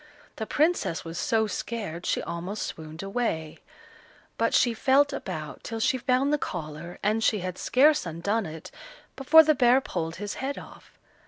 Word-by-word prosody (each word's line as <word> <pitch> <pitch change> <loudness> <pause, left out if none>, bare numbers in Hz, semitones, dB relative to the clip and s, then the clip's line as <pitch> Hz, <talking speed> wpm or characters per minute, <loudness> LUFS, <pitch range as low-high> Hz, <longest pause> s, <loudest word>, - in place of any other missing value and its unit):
The - - -4
Princess 305 - +1
was 165 +1 -5
so 220 -1 +2
scared 205 -6 -5
she - - 0
almost 175 +5 -4
swooned 160 +2 -8
away; 195 -7 -2 0.8
but - - +1
she 240 - +3
felt 275 +5 +3
about 155 - -6
till 225 0 -5
she 255 +3 +1
found 255 +3 +1
the 295 - +2
collar, 170 - -6
and 215 +2 +1
she 210 -3 +2
had 185 0 -5
scarce 290 - +3
undone 195 +6 -1
it 160 0 -9 0.4
before 320 +4 +7
the 310 0 +4
bear 250 -1 +5
pulled 165 -9 -4
his 205 +2 -5
head 275 +1 -3
off. - - -13
215 Hz, 165 wpm, -27 LUFS, 170-260 Hz, 0.8 s, before